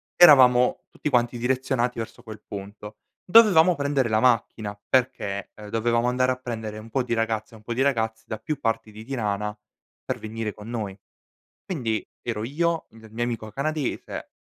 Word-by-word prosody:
eravamo 130 -2 +7
tutti - - -3
quanti 120 -2 +1
direzionati 125 -1 0
verso 115 +1 -6
quel 110 -3 -10
punto, 105 +1 -8 0.3
dovevamo 180 -4 +7
prendere 140 -4 0
la 110 -1 +2
macchina 110 -4 +1
perché, 100 -6 0
ehm, 105 -1 -10
dovevamo 115 +2 +1
andare 130 +1 +2
a - - 0
prendere 110 -4 -6
un 110 +1 -10
po' 135 - +1
di 125 -1 -1
ragazze 110 0 -2
e - - -11
un 105 - -19
po' 120 +2 -3
di 130 - 0
ragazzi 110 -5 0
da 110 - -4
più 145 +6 -4
parti 115 -3 -1
di 110 +1 -10
Tirana 105 -4 -2 0.5
per - - -3
venire 110 -1 -4
con 105 +1 -11
noi. 105 -5 -4 0.7
Quindi, 120 - -2
ero 110 -3 -3
io, 165 +6 0
il 110 0 -15
mio 120 +2 -2
amico 115 -2 -4
canadese, 145 +3 -3
115 Hz, 175 wpm, -25 LUFS, 110-130 Hz, 0.7 s, eravamo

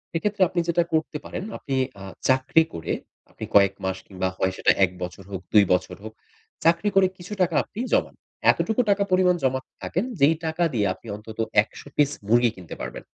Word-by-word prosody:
এক্ষেত্রে 205 +4 -1
আপনি 175 - -1
যেটা 170 0 +2
করতে 155 -1 0
পারেন - - -5
আপনি 135 - -4 0.3
আ - - -8 0.3
চাকরি 130 +5 +4
করে 80 -1 -4 0.4
আপনি - - -10
কয়েক 100 -1 +6
মাস 95 0 -1
কিংবা 95 -1 -2
হয় 95 - +1
সেটা - - +4
১ 90 - +3
বছর 90 +2 -7
হোক, 95 -2 -4
২ 105 -2 +8
বছর 90 - -1
হোক, 110 0 -8 0.5
চাকরি 170 +5 +3
করে 195 -1 +6
কিছু 180 +3 -8
টাকা 175 -3 +2
আপনি 210 - -11
জমান। - - +1 0.4
এতটুকু 220 +2 0
টাকা 200 0 +3
পরিমাণ 185 -1 +4
জমাতে 130 0 -1
থাকেন 185 +6 -1 0.2
যেই 150 +4 +6
টাকা 160 +2 0
দিয়ে 105 -4 +1
আপনি 115 - -17
অন্তত 110 +1 -11 0.2
১০০ 115 - -13
পিস 145 -1 +3 0.2
মুরগি 120 +2 +4
কিনতে 90 -3 -9
পারবেন। - - -6
135 Hz, 190 wpm, -24 LUFS, -, 0.5 s, ২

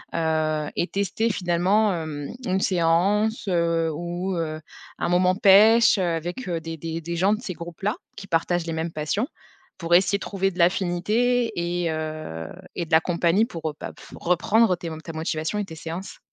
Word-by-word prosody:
Heu, 155 -2 0
et 175 - +1
tester 200 +4 -1
finalement 190 +4 +2
hem, 155 -4 -5
une 190 +1 0
séance, 200 +4 +2
heu, 165 -2 +1
ou 175 +4 -3
heu, 155 -1 -3 0.4
un - - 0
moment 180 +1 +3
pêche 215 +4 +6
avec 175 +5 -2
des 165 -1 -4
des 165 +1 -5
des 170 +1 -4
gens 190 +4 +3
de 215 - -3
ces 185 - -5
groupes-là, 175 +5 -4 0.2
qui 195 - -8
partagent 170 0 0
les 165 - -2
mêmes 160 +1 -2
passions. 155 - -1 0.5
Pour 170 -1 -2
essayer 195 +3 +4
de - - -31
trouver 195 -1 -1
de 180 - -13
l'affinité 210 +8 +2
et 175 -1 -1
heu, 155 - -5 0.3
et 170 - -2
de - - -19
la 160 0 +6
compagnie 175 +4 +2
pour, 165 -8 -4
heu, - - -15
bah, - - -6
pff, - - -15
reprendre 185 +4 +2
tes 170 -1 -6
ta 165 - -6
motivation 160 +4 -2
et 205 - -1
tes 165 -4 -10
séances. 165 +4 -7
175 Hz, 180 wpm, -24 LUFS, 165-195 Hz, 0.5 s, pêche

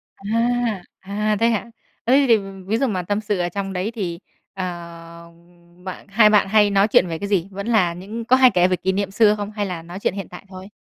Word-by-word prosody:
À. 230 -1 -1 0.2
À, 210 +2 -1
thế 230 +1 +3
hả? 225 -3 +1 0.5
Ơ, 245 - +3
thế 280 +1 +5
thì 230 -2 +6 0.3
ví 220 +3 +1
dụ 270 +2 +1
mà 190 -5 -1
tâm 205 +4 -2
sự 205 -3 -2
ở 175 0 0
trong 195 +1 -4
đấy 185 +4 -2
thì, 175 -5 -4 0.3
ờ, 185 -2 -3 0.5
ừm, 175 +1 -22
bạn 185 -1 -7
hai 215 +1 +5
bạn 210 -2 +4
hay 210 0 +4
nói 200 +1 +3
chuyện 185 -4 +4
về 165 -1 -4
cái 200 - -4
gì? 195 -3 0
Vẫn 200 +2 -6
là 200 -7 +2
những 210 +6 -7
có 255 +2 +5
hay 260 -1 +6
kể 180 -2 +3
về 185 - +1
kỷ 180 +2 -1
niệm 195 0 -2
xưa 210 0 +4
không? 205 0 -5
Hay 210 -1 -3
là 180 -4 -5
nói 175 +3 -9
chuyện - - -1
hiện 195 -2 -6
tại 180 +2 -11
thôi? 190 +1 -10
200 Hz, 250 wpm, -21 LUFS, 180-215 Hz, 0.5 s, thì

